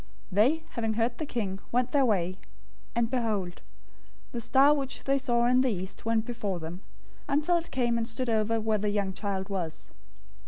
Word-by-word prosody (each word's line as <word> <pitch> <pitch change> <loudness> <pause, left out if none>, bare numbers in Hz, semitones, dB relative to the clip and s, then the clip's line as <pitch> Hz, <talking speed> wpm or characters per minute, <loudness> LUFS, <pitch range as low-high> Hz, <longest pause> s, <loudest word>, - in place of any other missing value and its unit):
002:009 - - -24 0.2
They, 255 - +3
having 225 -2 -1
heard 235 +1 0
the 310 - -1
king, 195 -7 -2
went 250 +1 +1
their 280 -2 +4
way; 185 -3 0 0.6
and 235 -1 +2
behold, 210 -8 -1 0.7
the 235 - -3
star, 275 +5 +5
which 275 -2 -3
they 275 0 +2
saw 240 -2 +2
in 250 +1 +4
the 260 - +2
east, 190 -2 -5
went 225 -1 +1
before 210 -7 -3
them, 170 +3 -7 0.5
until 300 +5 +3
it 335 - -5
came 240 -2 +1
and 225 - -2
stood 255 +2 -3
over 225 0 +2
where 215 -1 +1
the 210 +1 0
young 200 -2 0
child 195 -1 -3
was. 180 -6 -4
230 Hz, 190 wpm, -29 LUFS, 200-255 Hz, 0.7 s, star